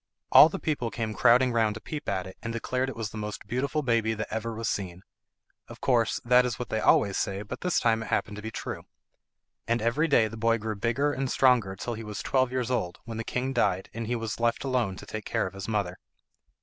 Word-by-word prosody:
All 155 - +10
the 195 - -4
people 145 -9 -1
came 110 -1 -3
crowding 120 +4 +5
round 110 -2 +2
to - - -6
peep 150 +5 -5
at 95 -2 -1
it, 95 - -10
and 115 - -4
declared 125 +3 -1
it - - -7
was 110 -2 -4
the 110 - -6
most 105 0 -5
beautiful 140 +5 -1
baby 115 -3 +1
that 110 - -4
ever 110 +1 -3
was 115 0 -3
seen. 95 -2 -3 0.6
Of - - -11
course 120 -4 +2
that 125 +1 +6
is 125 -3 -2
what 125 - -5
they 110 - 0
always 100 -2 +3
say, 100 +1 -2
but 105 - -7
this 180 -2 +1
time 115 -1 +2
it 110 - -6
happened 105 -1 -1
to - - -6
be 110 - -5
true. - - -6 0.8
And 115 +1 +1
every 120 +9 +1
day 120 -7 +4
the 115 +1 -8
boy 115 +1 +2
grew 110 0 -4
bigger 120 +8 0
and 135 -1 -2
stronger 125 -9 +3
till 120 +5 -4
he 115 0 -6
was 105 -2 -6
twelve 130 -2 +1
years 130 -1 -1
old, 90 -8 -1
when 115 -1 -6
the 115 - -3
king 130 +3 -2
died, 95 -6 0
and 115 -1 -4
he 120 - 0
was 115 -2 -4
left 115 0 +1
alone 125 -8 0
to 105 - -10
take 110 +1 -6
care - - 0
of 95 - -6
his 100 0 -7
mother. 100 -5 -1
115 Hz, 245 wpm, -27 LUFS, 105-125 Hz, 0.8 s, All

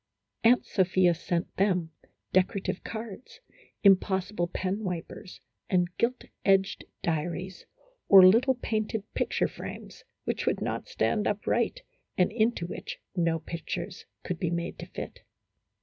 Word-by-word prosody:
Aunt 240 +2 +5
Sophia 185 -2 +3
sent 170 +1 -3
them 180 -4 +1 0.4
decorative 190 0 +1
cards, 230 - -7 0.4
impossible 190 -1 +3
penwipers, 185 0 -4 0.3
and 180 -1 +1
gilt 250 +2 +1 0.2
edged 195 0 +2 0.2
diaries, 175 +3 -3 0.4
or 190 -2 +10
little 240 +8 +6
painted 220 -3 -2
picture - - +1
frames, - - -9 0.2
which - - -2
would - - +2
not - - -3
stand 210 -2 +1
upright, 210 - 0 0.3
and 180 +1 +3
into 220 -5 +1
which 175 - -6 0.2
no 165 -2 +2
pictures 165 +1 -5 0.2
could 180 -2 -4
be 170 - 0
made 170 0 -3
to - - -7
fit. - - -7
190 Hz, 120 wpm, -28 LUFS, 175-215 Hz, 0.4 s, or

